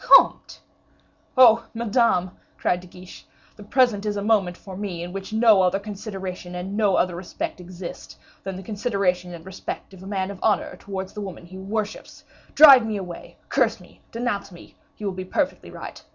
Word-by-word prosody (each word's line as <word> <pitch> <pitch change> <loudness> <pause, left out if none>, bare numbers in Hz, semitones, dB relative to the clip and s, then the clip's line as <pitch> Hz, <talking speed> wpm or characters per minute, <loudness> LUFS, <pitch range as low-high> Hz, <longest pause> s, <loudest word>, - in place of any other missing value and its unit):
"Comte!" - - +5 0.8
"Oh! 230 -3 +7
Madame," 225 -5 +2 0.3
cried 180 - +1
De 180 - -13
Guiche, 180 +1 -13 0.3
"the - - -14
present 210 -1 +2
is 210 -1 -2
a 200 - -2
moment 200 -5 +2
for 190 -3 -10
me, 185 -4 -4
in 175 +1 -7
which 195 +1 -6
no 220 -3 +5
other 185 +1 +3
consideration 195 -3 -6
and 185 +3 -5
no 205 -3 +3
other 175 -1 +1
respect 180 0 -5
exist, 180 0 -9 0.3
than 195 -1 -4
the 190 - -8
consideration 195 -4 -1
and 170 -1 -10
respect 190 +1 -7
of 185 - -13
a 190 - -10
man 195 -1 -2
of 195 - -9
honor 215 - +1
towards 190 -1 -6
the 210 - -6
woman 190 -3 -7
he 185 +2 -10
worships. 210 +2 -4 0.3
Drive 275 -5 +10
me 220 -2 -2
away, 180 -3 -8
curse - - +1
me, - - -18
denounce 230 -4 -2
me, 175 - -14 0.2
you 210 - -6
will 195 - -1
be 185 0 -5
perfectly 280 +9 -2
right. - - -9
195 Hz, 185 wpm, -24 LUFS, 185-215 Hz, 0.8 s, Drive